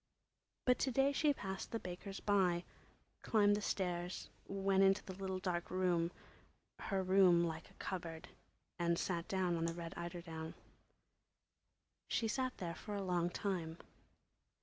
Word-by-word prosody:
But 250 Hz, -1 st, +4 dB
to 265 Hz, -, +1 dB
day 270 Hz, +3 st, +4 dB
she 295 Hz, +1 st, +3 dB
passed 195 Hz, -8 st, -4 dB
the 230 Hz, -, -1 dB
baker's 195 Hz, 0 st, -6 dB
by, 185 Hz, -4 st, +3 dB, 0.6 s
climbed 205 Hz, -2 st, +4 dB
the 210 Hz, -, -2 dB
stairs, 180 Hz, -3 st, -2 dB, 0.2 s
went 195 Hz, 0 st, +2 dB
into 195 Hz, 0 st, +5 dB
the 190 Hz, -, -6 dB
little 190 Hz, 0 st, -3 dB
dark 180 Hz, -2 st, -2 dB
room—her 185 Hz, +2 st, -2 dB
room 185 Hz, -2 st, +6 dB
like 160 Hz, -1 st, -3 dB
a -, -, -21 dB
cupboard—and 170 Hz, -1 st, -4 dB
sat 170 Hz, -2 st, -1 dB
down 185 Hz, -2 st, +1 dB
on 165 Hz, -, 0 dB
the 165 Hz, -, -2 dB
red 170 Hz, -1 st, -5 dB
eiderdown. 170 Hz, -2 st, -5 dB, 1.5 s
She 225 Hz, -, +1 dB
sat 255 Hz, +3 st, -1 dB
there 170 Hz, -2 st, -3 dB
for 205 Hz, +5 st, -6 dB
a 200 Hz, -, -2 dB
long 175 Hz, -2 st, +1 dB
time. 175 Hz, -4 st, -2 dB
185 Hz, 140 wpm, -38 LUFS, 170-195 Hz, 1.5 s, room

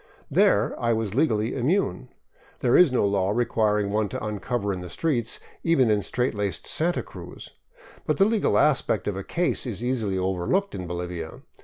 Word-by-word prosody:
There -, -, +3 dB
I 115 Hz, -1 st, +2 dB
was 110 Hz, -3 st, -2 dB
legally 115 Hz, -5 st, +1 dB
immune. 135 Hz, -, 0 dB, 0.5 s
There 120 Hz, -, +3 dB
is 180 Hz, -6 st, +6 dB
no 125 Hz, -5 st, +2 dB
law 100 Hz, -1 st, +1 dB
requiring 105 Hz, -2 st, +1 dB
one 105 Hz, -1 st, 0 dB
to -, -, -5 dB
uncover 105 Hz, 0 st, -2 dB
in 90 Hz, -, -5 dB
the 90 Hz, -, -8 dB
streets, 120 Hz, -, -1 dB, 0.2 s
even 135 Hz, -9 st, +3 dB
in 105 Hz, -1 st, +2 dB
straight 125 Hz, +5 st, -1 dB
laced 100 Hz, -5 st, -3 dB
Santa 170 Hz, +2 st, 0 dB
Cruz. -, -, -11 dB, 0.6 s
But -, -, +1 dB
the 195 Hz, -, +5 dB
legal 220 Hz, 0 st, +2 dB
aspect 150 Hz, -3 st, +2 dB
of 105 Hz, -, -1 dB
a 95 Hz, -, -5 dB
case 175 Hz, -, 0 dB
is 115 Hz, -1 st, -5 dB
easily 115 Hz, -6 st, -1 dB
overlooked 95 Hz, -, 0 dB
in 90 Hz, -1 st, -5 dB
Bolivia. 85 Hz, -1 st, -5 dB
110 Hz, 175 wpm, -25 LUFS, 100-130 Hz, 0.6 s, is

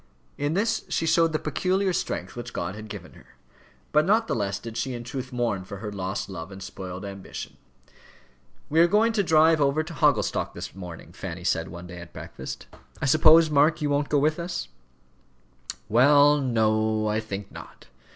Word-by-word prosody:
In 145 Hz, +3 st, -1 dB
this 225 Hz, +4 st, +1 dB
she -, -, 0 dB
showed 165 Hz, 0 st, +3 dB
the 155 Hz, -, +1 dB
peculiar 185 Hz, +6 st, 0 dB
strength -, -, -3 dB
which 120 Hz, 0 st, -7 dB
God 85 Hz, +2 st, -3 dB
had 105 Hz, +1 st, -9 dB
given -, -, -9 dB
her. -, -, -19 dB, 0.6 s
But 150 Hz, 0 st, +4 dB
not 215 Hz, +6 st, +3 dB
the -, -, -1 dB
less 100 Hz, -2 st, -1 dB
did 110 Hz, +3 st, -8 dB
she 130 Hz, +1 st, -2 dB
in 120 Hz, -, -6 dB
truth 130 Hz, +2 st, -6 dB
mourn 120 Hz, -6 st, -1 dB
for 100 Hz, +2 st, -8 dB
her 105 Hz, +1 st, -6 dB
lost 95 Hz, -1 st, -3 dB
love 90 Hz, -1 st, -7 dB
and 95 Hz, -, -9 dB
spoiled 95 Hz, 0 st, -7 dB
ambition. 100 Hz, -1 st, -8 dB, 1.1 s
"We 160 Hz, -, +1 dB
are 170 Hz, -, +7 dB
going 215 Hz, +5 st, +3 dB
to 215 Hz, -, +2 dB
drive 160 Hz, -3 st, +4 dB
over 140 Hz, +2 st, +2 dB
to 165 Hz, +2 st, -9 dB
Hogglestock 145 Hz, -2 st, +1 dB
this -, -, -7 dB
morning," 90 Hz, -3 st, -9 dB
Fanny -, -, -7 dB
said -, -, 0 dB
one 85 Hz, +1 st, -9 dB
day 90 Hz, 0 st, -9 dB
at 85 Hz, -, -11 dB
breakfast. 65 Hz, -, -8 dB, 0.3 s
"I -, -, -2 dB
suppose, 155 Hz, +2 st, +6 dB
Mark, 150 Hz, +3 st, +4 dB
you 150 Hz, -2 st, -1 dB
won't 145 Hz, 0 st, 0 dB
go 150 Hz, -, +3 dB
with 150 Hz, +3 st, +2 dB
us?" 175 Hz, 0 st, -4 dB, 1.2 s
"Well, 145 Hz, +6 st, +5 dB
no; 110 Hz, -3 st, +1 dB
I 105 Hz, +1 st, +1 dB
think 105 Hz, -2 st, -6 dB
not. -, -, -12 dB
135 Hz, 190 wpm, -26 LUFS, 100-155 Hz, 1.2 s, are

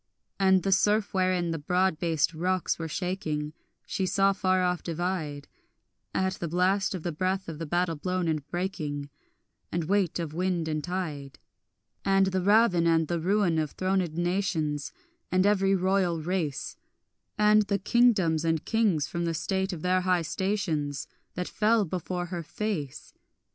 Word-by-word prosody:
And 190 Hz, -1 st, +4 dB
the 195 Hz, -, 0 dB
surf 205 Hz, +2 st, +2 dB
wherein 185 Hz, -2 st, +1 dB
the 165 Hz, -, -3 dB
broad 180 Hz, +2 st, +1 dB
based 165 Hz, -2 st, +1 dB
rocks 180 Hz, +3 st, -1 dB
were 165 Hz, -, -3 dB
shaking 155 Hz, -4 st, -3 dB, 0.3 s
She 190 Hz, -, -2 dB
saw 195 Hz, +1 st, +3 dB
far 185 Hz, -1 st, +1 dB
off 180 Hz, -1 st, 0 dB
divide, 165 Hz, -4 st, -3 dB, 0.6 s
At 190 Hz, 0 st, 0 dB
the 170 Hz, -, -2 dB
blast 185 Hz, +4 st, +1 dB
of 175 Hz, -, -6 dB
the 175 Hz, -, -2 dB
breath 185 Hz, +4 st, -1 dB
of 160 Hz, -2 st, -6 dB
the 165 Hz, -, -4 dB
battle 175 Hz, +1 st, 0 dB
blown 180 Hz, +3 st, -2 dB
and 155 Hz, -3 st, 0 dB
breaking, 150 Hz, -6 st, -3 dB, 0.6 s
And 170 Hz, 0 st, -1 dB
weight 190 Hz, 0 st, +1 dB
of 165 Hz, -3 st, -4 dB
wind 175 Hz, -1 st, -1 dB
and 155 Hz, -1 st, -2 dB
tide; 155 Hz, -7 st, -4 dB, 0.7 s
And 195 Hz, 0 st, +4 dB
the 190 Hz, -1 st, 0 dB
ravin 200 Hz, -3 st, +4 dB
and 165 Hz, -1 st, +2 dB
the 170 Hz, -1 st, 0 dB
ruin 180 Hz, -1 st, +2 dB
of 155 Hz, -2 st, -3 dB
thronèd 185 Hz, -3 st, 0 dB
nations 175 Hz, -5 st, -1 dB, 0.4 s
And 185 Hz, +1 st, +3 dB
every 195 Hz, -1 st, +3 dB
royal 185 Hz, -2 st, +1 dB
race, 160 Hz, -4 st, -2 dB, 0.6 s
And 210 Hz, 0 st, +5 dB
the 200 Hz, -, +1 dB
kingdoms 200 Hz, -7 st, +3 dB
and 165 Hz, -1 st, 0 dB
kings 205 Hz, -10 st, +2 dB
from 170 Hz, +3 st, -3 dB
the 165 Hz, -1 st, -1 dB
state 190 Hz, +4 st, -1 dB
of 165 Hz, -4 st, -6 dB
their 185 Hz, 0 st, +2 dB
high 180 Hz, -2 st, +2 dB
stations 160 Hz, -6 st, -2 dB, 0.3 s
That 180 Hz, 0 st, -3 dB
fell 220 Hz, 0 st, +2 dB
before 180 Hz, +1 st, -3 dB
her 175 Hz, -, -2 dB
face. 165 Hz, -5 st, -4 dB
180 Hz, 160 wpm, -28 LUFS, 160-190 Hz, 0.7 s, And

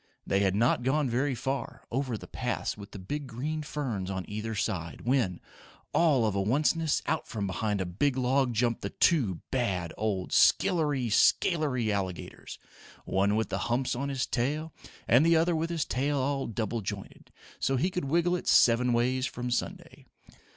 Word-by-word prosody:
They 100 Hz, -, +1 dB
had 95 Hz, -1 st, +2 dB
not 120 Hz, +3 st, +2 dB
gone 135 Hz, +1 st, +1 dB
very 130 Hz, +3 st, 0 dB
far, 130 Hz, -1 st, -4 dB
over 130 Hz, -2 st, -1 dB
the -, -, -10 dB
paths -, -, -3 dB
with 100 Hz, -1 st, -10 dB
the -, -, -9 dB
big 140 Hz, +10 st, -5 dB
green 145 Hz, +6 st, -3 dB
ferns 130 Hz, -11 st, -3 dB
on 95 Hz, -1 st, -3 dB
either 110 Hz, +2 st, -4 dB
side, 95 Hz, -5 st, -3 dB
when, 120 Hz, -8 st, +1 dB, 0.5 s
all 150 Hz, -9 st, +4 dB
of 105 Hz, -, 0 dB
a -, -, +1 dB
onceness 150 Hz, -, +1 dB
out -, -, -1 dB
from 105 Hz, -3 st, -3 dB
behind 100 Hz, +2 st, -1 dB
a 95 Hz, -, -1 dB
big 125 Hz, +10 st, 0 dB
log 130 Hz, 0 st, +2 dB
jumped 115 Hz, 0 st, 0 dB
the 100 Hz, -, -3 dB
two 110 Hz, -, +2 dB
bad 95 Hz, -10 st, -1 dB
old 100 Hz, -4 st, -2 dB
skillery 145 Hz, -, +3 dB
scalery 130 Hz, -, +2 dB
alligators, 95 Hz, -5 st, -4 dB, 0.5 s
one 100 Hz, +2 st, +1 dB
with 110 Hz, +1 st, 0 dB
the 95 Hz, 0 st, -2 dB
humps 125 Hz, +1 st, 0 dB
on 140 Hz, +3 st, -2 dB
his 130 Hz, -4 st, -1 dB
tail 150 Hz, +6 st, -2 dB, 0.3 s
and 125 Hz, +5 st, +5 dB
the 165 Hz, +1 st, +4 dB
other 165 Hz, +1 st, +3 dB
with 160 Hz, +1 st, -1 dB
his 165 Hz, -3 st, -1 dB
tail 140 Hz, +3 st, -1 dB
all 135 Hz, +1 st, -1 dB
double 115 Hz, +1 st, -2 dB
jointed, 95 Hz, -, -7 dB, 0.3 s
so 135 Hz, -, +1 dB
he 175 Hz, +9 st, +1 dB
could 180 Hz, -5 st, -3 dB
wiggle 170 Hz, +5 st, +2 dB
it 180 Hz, -, -5 dB
seven 120 Hz, +1 st, +5 dB
ways 130 Hz, +3 st, +1 dB
from 125 Hz, 0 st, -5 dB
Sunday. 120 Hz, -, -4 dB
125 Hz, 180 wpm, -29 LUFS, 105-145 Hz, 0.5 s, and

